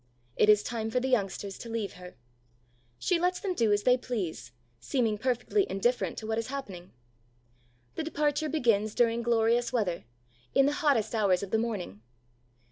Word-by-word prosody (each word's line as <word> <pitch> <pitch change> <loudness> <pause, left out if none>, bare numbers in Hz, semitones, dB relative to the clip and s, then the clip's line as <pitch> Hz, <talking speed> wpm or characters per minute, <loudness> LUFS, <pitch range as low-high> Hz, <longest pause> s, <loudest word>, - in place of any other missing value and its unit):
It 210 - +3
is 210 -1 +6
time 225 -1 -3
for 250 - +1
the 260 - -2
youngsters 200 -4 -1
to 235 - -8
leave 225 -3 -3
her. 180 0 -12 0.8
She 355 - +1
lets 360 +1 +1
them 385 -2 -2
do 230 -10 +2
as 205 0 +2
they 250 0 +5
please, 185 - -4 0.3
seeming 215 - 0
perfectly 255 - 0
indifferent 240 +6 0
to 220 - -6
what 220 +1 -1
is 230 - -4
happening. 200 -11 -7 1.0
The - - -3
departure 300 -1 0
begins 225 -8 +1
during 235 -1 +2
glorious 235 0 +2
weather, 205 - -1 0.5
in 275 - +6
the 290 - +2
hottest 275 -9 +2
hours 200 -4 +2
of 200 - -6
the 220 - +2
morning. 200 - -4
230 Hz, 170 wpm, -29 LUFS, 205-255 Hz, 1.0 s, is